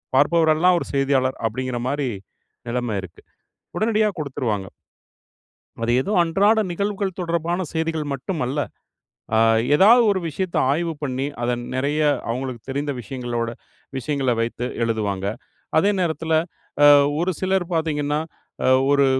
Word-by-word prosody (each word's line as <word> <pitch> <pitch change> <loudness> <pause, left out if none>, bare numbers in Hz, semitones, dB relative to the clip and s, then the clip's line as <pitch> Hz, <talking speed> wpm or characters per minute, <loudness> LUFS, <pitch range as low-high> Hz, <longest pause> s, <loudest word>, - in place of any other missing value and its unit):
பார்ப்பவரெல்லாம் 160 +4 +4
ஒரு - - -6
செய்தியாளர் 135 -1 +1
அப்படிங்கிற 125 +2 -3
மாரி 140 -1 -1 0.6
நிலைமை 120 -3 -1
இருக்கு. 90 -3 -12 0.6
உடனடியா 215 -1 +2
குடுத்துருவாங்க. 120 -9 -2 1.2
அது 115 - +1
ஏதோ 200 - -4
அன்றாட 200 +6 +3
நிகழ்வுகள் 200 0 -2
தொடர்பான 170 +1 -1
செய்திகள் 160 -1 -1
மட்டுமல்ல. 140 -1 -3 0.8
அ - - +4 0.4
ஏதாவது 220 +9 +7
ஒரு 190 - 0
விஷயத்தை 180 +4 -2
ஆய்வு 165 +3 0
பண்ணி, 135 -2 -2 0.2
அதை 120 +1 +1 0.2
நிறைய 145 +4 0 0.3
அவங்களுக்கு 125 0 -3
தெரிந்த 145 +2 -2
விஷயங்களோட 120 -2 -3 0.5
விஷயங்கள 135 0 -1
வைத்து 115 +1 -2 0.2
எழுதுவாங்க. 105 -4 -1 0.5
அதே 200 +6 +4
நேரத்தில, 160 -1 -1 0.9
ஒரு 180 +2 +1
சிலர் 190 -1 +1
பார்த்தீங்கணா, 150 -2 0 0.7
ஒரு 140 -1 +4
145 Hz, 115 wpm, -22 LUFS, 125-170 Hz, 1.2 s, ஏதாவது